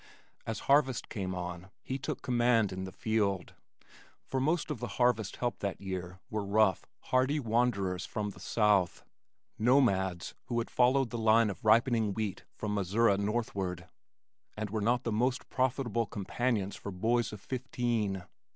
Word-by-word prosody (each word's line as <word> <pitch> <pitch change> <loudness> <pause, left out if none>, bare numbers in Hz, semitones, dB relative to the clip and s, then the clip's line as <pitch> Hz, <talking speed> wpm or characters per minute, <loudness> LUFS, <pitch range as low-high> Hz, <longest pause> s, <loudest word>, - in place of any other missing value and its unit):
As 110 -1 -3
harvest 135 -3 +2
came 95 -3 -3
on 90 +1 -5
he 130 +1 -3
took 135 - -4
command 120 -4 +3
in 95 0 -4
the 95 - -7
field, 100 -3 -1 0.7
for 130 - -2
most 155 +3 0
of 140 - -4
the 120 - -3
harvest 120 -5 +2
help 120 -4 -2
that 100 -1 -3
year 95 -1 -5
were 105 -1 -1
rough, 100 -2 +2 0.2
hardy 130 +4 +3
wanderers 110 -7 0
from 105 0 -3
the - - -14
south, 105 -5 +2 0.6
nomads 100 -8 +2
who 120 - -2
had 115 - -2
followed 125 0 +3
the 120 - -3
line 110 -1 +4
of - - -11
ripening 110 -1 +3
wheat 105 -4 -3
from 105 -1 -3
Missouri 100 +2 +3
northward, 100 -5 -2 0.7
and 105 -2 -3
were 110 -1 -1
not 120 +3 +2
the 115 - -1
most 125 +5 0
profitable 125 -3 0
companions 105 0 -1
for - - -7
boys 115 +6 +1
of 105 - -8
fifteen. 120 -5 -2
110 Hz, 155 wpm, -31 LUFS, 100-120 Hz, 0.7 s, line